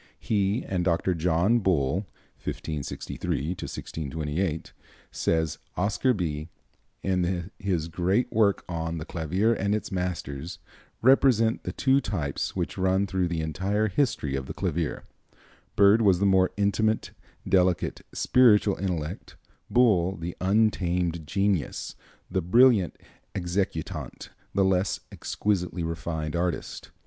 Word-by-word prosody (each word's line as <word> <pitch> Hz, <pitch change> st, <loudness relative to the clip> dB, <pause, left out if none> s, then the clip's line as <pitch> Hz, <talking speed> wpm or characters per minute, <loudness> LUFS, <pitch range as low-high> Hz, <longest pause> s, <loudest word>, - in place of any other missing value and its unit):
He 100 Hz, +2 st, 0 dB
and 90 Hz, -2 st, -1 dB
Dr. 85 Hz, +1 st, +1 dB
John 90 Hz, +7 st, +2 dB
Bull 95 Hz, -, +1 dB, 0.4 s
(1563 75 Hz, -1 st, -4 dB
1628), 80 Hz, -1 st, -4 dB, 0.4 s
says 80 Hz, -2 st, 0 dB, 0.2 s
Oscar 105 Hz, +8 st, +2 dB
Bie, 80 Hz, -4 st, -3 dB, 0.5 s
in 90 Hz, -1 st, -1 dB
his 90 Hz, -5 st, -1 dB
great 90 Hz, +8 st, 0 dB
work 105 Hz, -3 st, +2 dB
on 85 Hz, -1 st, -3 dB
"The 80 Hz, -, -5 dB
Clavier 90 Hz, +8 st, 0 dB
and 100 Hz, -1 st, 0 dB
Its 105 Hz, -, -4 dB
Masters," 85 Hz, -3 st, -4 dB, 0.5 s
"represent 120 Hz, -3 st, +4 dB
the -, -, -4 dB
two 135 Hz, 0 st, +2 dB
types 75 Hz, -, -3 dB
which -, -, -3 dB
run 95 Hz, +1 st, +2 dB
through 95 Hz, -2 st, 0 dB
the 85 Hz, -2 st, -2 dB
entire 95 Hz, +7 st, 0 dB
history 95 Hz, -, 0 dB
of 65 Hz, -1 st, -4 dB
the -, -, -6 dB
clavier. 85 Hz, -4 st, -2 dB, 0.7 s
Byrd 100 Hz, +3 st, +6 dB
was 100 Hz, -5 st, +5 dB
the 100 Hz, -, +1 dB
more 95 Hz, -1 st, +4 dB
intimate, 110 Hz, +2 st, +1 dB, 0.4 s
delicate, 90 Hz, -2 st, +2 dB
spiritual 105 Hz, -5 st, +4 dB
intellect; 90 Hz, -2 st, -4 dB, 0.3 s
Bull 95 Hz, -7 st, +3 dB
the 85 Hz, +1 st, -5 dB
untamed 90 Hz, -5 st, +1 dB
genius, 100 Hz, -2 st, -1 dB, 0.3 s
the 95 Hz, -, -1 dB
brilliant 110 Hz, +1 st, +4 dB, 0.4 s
executant, 90 Hz, -3 st, -3 dB, 0.2 s
the 95 Hz, -1 st, +4 dB
less 95 Hz, 0 st, +1 dB
exquisitely 90 Hz, -4 st, -2 dB
refined 80 Hz, -1 st, -3 dB
artist. 85 Hz, -1 st, -3 dB
90 Hz, 115 wpm, -27 LUFS, 85-100 Hz, 0.7 s, Byrd